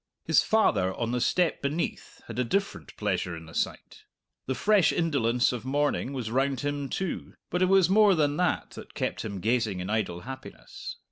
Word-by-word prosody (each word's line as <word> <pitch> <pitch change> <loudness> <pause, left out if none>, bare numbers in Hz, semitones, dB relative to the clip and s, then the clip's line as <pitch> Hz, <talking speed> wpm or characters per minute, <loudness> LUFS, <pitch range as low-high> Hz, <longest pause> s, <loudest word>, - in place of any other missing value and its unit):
His - - +5
father 95 - +2
on 115 0 -2
the 125 0 -1
step 175 +4 +1
beneath 145 +5 -3
had - - -6
a - - +3
different 195 +11 -2
pleasure 90 -4 -1
in 80 - -10
the 80 - -13
sight. - - -4 0.4
The 130 - -1
fresh 205 +1 +4
indolence 125 -8 +2
of 125 -2 -5
morning 140 0 0
was 125 -5 -4
round 135 +1 +1
him 145 -1 -2
too, 190 -3 -4 0.2
but 180 - 0
it 185 - +4
was 190 -3 +5
more 205 0 +5
than 145 -2 +2
that 180 -2 0
that - - -11
kept - - -2
him 100 -3 -5
gazing 110 -2 0
in 90 +3 -4
idle 95 -6 -1
happiness. 130 +3 -9
135 Hz, 190 wpm, -28 LUFS, 110-170 Hz, 0.4 s, His